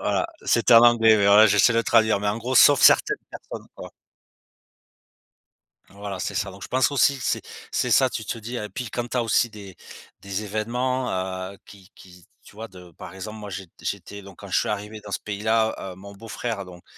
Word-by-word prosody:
Voilà, - - 0 0.2
c'était 120 0 +3
en 115 - +9
anglais, 115 -2 +5
mais 100 -1 +2
voilà, 105 +2 +7
j'essaie 105 +3 +4
de 115 - +2
traduire, 110 -3 +3
mais 105 - -1
en 105 +2 -2
gros 125 +3 -4
sauf 140 +1 +6
certaines - - +5
personnes, - - -10
quoi. - - -10 2.0
Voilà, 100 -1 -8
c'est - - -4
ça. 100 - -2
Donc 100 +2 -14
je - - -7
pense 130 +2 +1
aussi, 140 0 +2
que 125 - -9
c'est - - -1 0.3
c'est - - -1
ça, - - +4
tu - - -5
te - - -4
dis 115 +2 -7
et 105 -2 -5
puis 125 -3 -6
quand 120 0 -3
tu 125 - -3
as 120 - +1
aussi 115 +1 +1
des 100 -4 -12 0.5
des 100 +1 -5
événements, 125 +5 -2 0.4
heu, 100 - -14
qui 95 -3 -16
qui 90 -2 -17 0.2
tu - - -18
vois 110 +1 -8
de, 90 -3 -15
par 90 +2 -11
exemple, 105 +3 -8
moi 105 -1 -8
jé 95 0 -7
j'étais 100 +1 -6
donc 100 0 -14
quand 100 - -10
je - - +2
suis - - -2
arrivé 105 +1 -5
dans 105 - -10
ce - - -2
pays-là 110 +2 -1
heu, 95 -1 -8
mon 100 +2 -12
beau-frère 110 0 -5
donc 90 -1 -14
105 Hz, 220 wpm, -23 LUFS, 100-115 Hz, 2.0 s, en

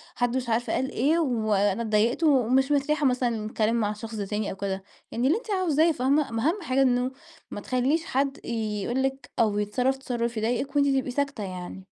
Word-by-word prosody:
حد 245 0 0
مش 250 -2 -3
عارف 230 +2 0
قال 260 - -1
إيه، 300 +7 +2
وأنا 215 - +1
أتضايقت 225 +6 +1
ومش 265 -2 +3
مرتاحة 295 +1 +1
مثلًا 250 -2 +1
للكلام 215 +1 -1
مع 215 -3 +1
الشخص 220 +2 -7
ده 205 -2 -3
تاني، 210 +1 -2
أو - - -6
كده، 195 0 -3 0.3
يعني 240 +3 0
اللي 320 +8 +3
أنتِ 460 -2 -7
عاوزاه، 335 -4 +3
فاهمة؟ 280 +1 +1
أما 225 -1 -2
أهم 390 +5 -2
حاجة 270 -5 +1
إنه 250 -1 +2 0.4
ما 205 - -5
تخليش 265 +9 0
حد 275 0 0
يقول 225 +2 -2
لِك 270 -1 -3
أو 210 -2 +2
يتصرف 250 +6 0
تصرف 240 -3 -3
يضايقِك، 245 +6 -1
وأنتِ 285 -1 +4
تبقي 265 -2 +1
ساكتة 280 -4 -2
يعني. 185 0 -7
245 Hz, 195 wpm, -26 LUFS, 220-275 Hz, 0.4 s, وأنتِ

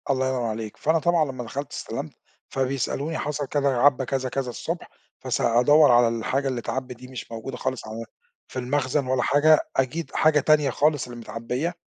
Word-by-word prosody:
الله 130 -1 +2
ينور 130 -2 -1
عليك، 110 -1 -4
فأنا 160 +2 +2
طبعًا 170 -1 +3
لمّا 130 -2 -6
دخلت 140 +4 -5
استلمت - - -5 0.4
فبيسألوني 135 +4 -1
حصل 145 -1 -3
كذا، 140 0 +1
عَبّى 135 +1 +4
كذا 130 0 -2
كذا 135 -1 -2
الصبح 120 - -5 0.3
فس - - -2
أدور 135 +5 +5
على 120 0 +6
الحاجة 115 +4 -1
اللي 130 -2 -1
أتعَبِّت 125 +1 -4
دي 125 +2 -12
مش 130 -2 -8
موجودة 115 +3 -6
خالص 130 -3 -3
على 115 +1 -6 0.4
في 130 - -5
المخزن 135 +2 0
ولا 130 -1 +1
حاجة، 155 +2 +5 0.2
أكيد 135 +3 -1
حاجة 155 -1 +4
تانية 150 0 +3
خالص 145 -3 +1
اللي 120 -1 -9
متعَبية، 125 +8 -3
130 Hz, 180 wpm, -25 LUFS, 125-145 Hz, 0.4 s, على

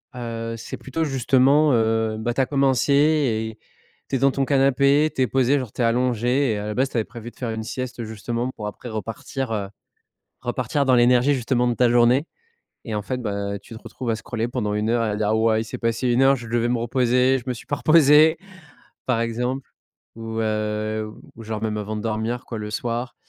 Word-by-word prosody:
heu, 115 -1 -5
c'est 110 - -7
plutôt 160 +5 -3
justement, 135 +1 +3
heu, 110 -1 +1
bah, 120 +2 -1
tu 135 - +1
as 130 - +2
commencé 135 -1 +2
et 130 -8 +2 0.5
tu 135 - -1
es - - 0
devant 135 +1 +4
ton 135 0 0
canapé, 140 +2 +3
tu - - -1
es 130 - +3
posé, 135 +2 +2
genre, 125 -5 -6
tu - - -4
es - - +3
allongé, 125 +2 +1
et - - -2
à 105 +1 -4
la 105 - -3
base, 130 +3 +1
tu - - -4
avais 110 - +2
prévu 120 0 -9
de - - -32
faire 120 -3 -4
une 110 0 -4
sieste 125 +1 -5
justement 115 +3 -3
pour 105 -1 -5
après 120 +4 -8
repartir, 115 +3 -5
heu, 100 -3 -2 0.7
repartir 130 +3 -1
dans 130 - +4
l'énergie 125 +3 +4
justement 125 -1 0
de 120 - 0
ta 125 +1 +3
journée. 120 +5 +4 0.6
Et 110 - -4
en 105 - -2
fait, 125 +4 -3
bah, 100 -2 -3
tu 100 +3 -13
te - - -13
retrouves 125 -3 -5
à 110 - 0
scroller 115 0 -3
pendant 115 -5 -2
1 105 +2 0
heure, 120 0 +2
à 105 -2 -1
dire: 105 +1 +1
«Wow! 110 0 +3
Il 110 - 0
s'est 110 - -7
passé 115 +2 -1
1 120 +2 +3
heure, 135 +1 +5
je 120 -2 -9
devais 120 0 0
me 120 - +1
reposer, 125 +2 +2
je 120 - -10
me 125 - -1
suis - - -12
pas 145 - -1
reposé», 155 0 +5 0.7
par 120 -3 +1
exemple. 125 +3 -2 0.5
Ou 115 0 -4
heu, 110 0 -2 0.3
ou 115 - -10
genre, 110 -1 -5
même 110 -1 -1
avant 105 +1 -4
de 105 - -4
dormir, 115 +3 -2
quoi, 115 -3 -6
le 105 - -5
soir. 120 +3 -3
120 Hz, 225 wpm, -23 LUFS, 110-130 Hz, 0.7 s, heure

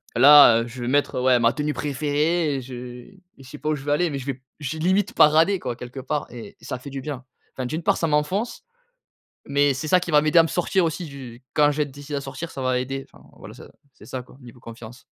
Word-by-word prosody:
là, 135 -2 +8
heu, 115 - -5
je 125 +1 -9
vais 120 - -3
mettre, 140 0 +1
ouais, 125 -1 +3
ma 115 0 +3
tenue 150 0 -2
préférée 150 +3 0
et - - -4
je 130 +1 -10
et 125 +9 -10 0.2
je 130 -1 -14
sais 150 - -9
pas 150 - -4
où 155 - +1
je 135 - -9
vais 145 - -1
aller 170 +4 +2
mais 140 - -3
je 130 - -9
vais 135 -1 -4 0.2
j'ai 150 +2 -5
limite 190 +5 +1
paradé 160 +6 +4
quoi, 125 -6 -4
quelque 125 +2 -9
part 145 +3 -3
et 120 -1 -10
ça 125 - -6
fait 140 - -10
du 135 0 -5
bien. 135 -2 -6 0.3
Enfin, 130 - -5
d'une 155 +7 -4
part - - +2
ça 165 - 0
m'enfonce 160 +10 -1 0.9
mais 140 0 +3
c'est 155 +4 -5
ça 185 - +4
qui 175 - -5
va 150 - +6
m'aider 155 +2 +4
à - - +7
me - - -1
sortir 180 +2 0
aussi 165 +2 -3
du 130 -5 -10
quand 145 -1 +4
je 145 - -6
vais 150 - +2
être 145 - -9
décidé 145 +2 -7
à - - -3
sortir, 150 +5 -7
ça 135 - -7
va 130 -1 +1
aider, 135 +2 -5
enfin, - - -19
voilà - - -11
ça - - -13 0.2
c'est - - -17
ça 130 - -6
quoi, 125 - -18
niveau 120 -1 -14
confiance. 115 +1 -12
140 Hz, 265 wpm, -23 LUFS, 125-155 Hz, 0.9 s, là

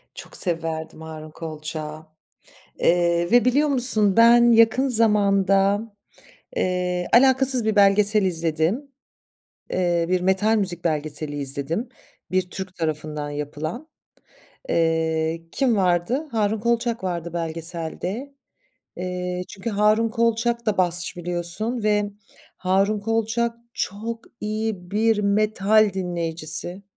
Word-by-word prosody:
Çok - - -11
severdim 160 -2 -4
Harun 155 -1 -9
Kolçak'ı. 155 -1 -7 0.7
Eee, 170 0 +1
ve 245 0 +5
biliyor 280 +4 +3
musun, 225 -7 +7
ben 235 +1 +6
yakın 230 +4 +4
zamanda, 200 -3 +2 0.8
eee, 180 -1 -1
alakasız 260 0 +4
bir 215 -1 0
belgesel 205 +1 +4
izledim. 170 - -1 0.8
Eee, 175 -2 0
bir 185 0 +1
metal 190 +4 +2
müzik 185 -5 0
belgeseli 155 -2 -3
izledim, 145 - -3 0.4
bir 185 -1 0
Türk 190 0 -7
tarafından 155 -2 -4
yapılan. 150 - -6 0.8
Iıı, 160 0 0
kim 260 -4 +1
vardı? 190 - 0
Harun 215 -1 0
Kolçak 235 0 -1
vardı 170 -2 -4
belgeselde. 170 - -5 0.6
Eee, 180 0 -4
çünkü 195 +4 -6
Harun 215 +2 +2
Kolçak 235 +1 0
da 215 -2 0
basçı 175 -1 +2
biliyorsun 175 +7 0
ve 210 -1 +2 0.5
Harun 195 +3 +1
Kolçak 225 +2 -1 0.2
çok 225 +4 -4 0.2
iyi 215 -4 -4
bir 220 +1 +2
metal 210 0 +2
dinleyicisi. 170 0 -2
190 Hz, 105 wpm, -22 LUFS, 170-225 Hz, 0.8 s, musun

